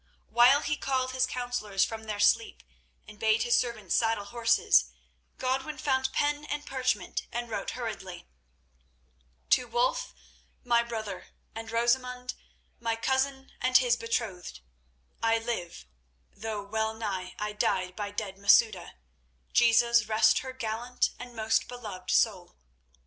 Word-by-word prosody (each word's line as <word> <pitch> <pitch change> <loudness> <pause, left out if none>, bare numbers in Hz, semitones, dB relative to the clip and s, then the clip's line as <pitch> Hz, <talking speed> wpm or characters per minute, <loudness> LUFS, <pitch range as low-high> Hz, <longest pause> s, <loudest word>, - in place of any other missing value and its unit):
While 250 +5 +6
he 295 0 -1
called 260 -1 -1
his 255 0 +1
counsellors 245 -6 -1
from 225 -1 -7
their 210 -1 -4
sleep 205 - +2 0.4
and 210 - -13
bade 220 +1 +3
his 240 0 +3
servants 225 -6 -3
saddle 225 -3 +1
horses, 230 - +3 0.5
Godwin 265 +4 -2
found 265 -1 0
pen 295 0 0
and 295 0 -4
parchment, 255 -7 -2
and 240 0 -4
wrote - - -3
hurriedly: 195 -7 -6 1.2
"To 250 - +4
Wulf, - - 0 0.5
my 235 -1 +3
brother, 220 -5 -6 0.3
and 225 0 -7
Rosamund, 250 +2 0 0.5
my 230 -1 -1
cousin 265 +3 -1
and 255 0 +5
his 245 -2 +3
betrothed,—I 120 - -4
live, 225 -7 -5 0.5
though 215 -1 -5
well 220 +2 -2
nigh 190 -5 -4
I 210 0 -3
died 185 -3 0
by 205 -1 -4
dead 200 -2 -5
Masouda—Jesus 200 - +2
rest 215 0 +4
her 260 - -6
gallant 240 0 -2
and 245 -1 -9
most 220 0 +1
beloved 210 -7 -8
soul! 190 -6 +1
230 Hz, 125 wpm, -29 LUFS, 205-250 Hz, 1.2 s, While